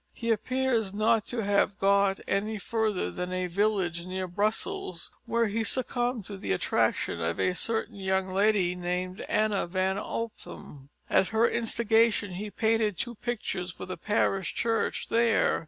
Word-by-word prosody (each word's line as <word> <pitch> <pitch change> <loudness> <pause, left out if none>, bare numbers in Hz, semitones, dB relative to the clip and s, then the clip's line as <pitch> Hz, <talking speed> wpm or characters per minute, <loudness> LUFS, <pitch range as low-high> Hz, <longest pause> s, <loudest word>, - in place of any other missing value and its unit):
He 230 -1 -1
appears 225 -2 0
not 215 0 +2
to 235 -2 -2
have 200 0 +2
got 200 0 +3
any 215 +2 0
further 215 -1 -1
than 180 0 -4
a 185 0 -1
village 180 -2 0
near 185 0 -3
Brussels, 185 -2 -1 0.2
where 235 0 +2
he 220 +1 -1
succumbed 245 -2 0
to 200 0 -7
the 95 - -1
attractions 85 -2 0
of 80 +1 -1
a 185 - +2
certain 220 +3 -1
young 190 -1 0
lady 195 -2 +2
named 180 +1 -3
Annah 210 -3 +1
van 190 +2 0
Ophem. 175 -11 -7 0.2
At 190 - +3
her 225 +1 +3
instigation 225 -2 +2
he 200 +4 -5
painted 220 -2 +1
two 240 - -2
pictures 215 -6 -3
for 170 - -7
the 185 - -5
parish 195 -3 0
church 230 -1 0
there. 230 0 +3
205 Hz, 155 wpm, -28 LUFS, 185-225 Hz, 0.2 s, got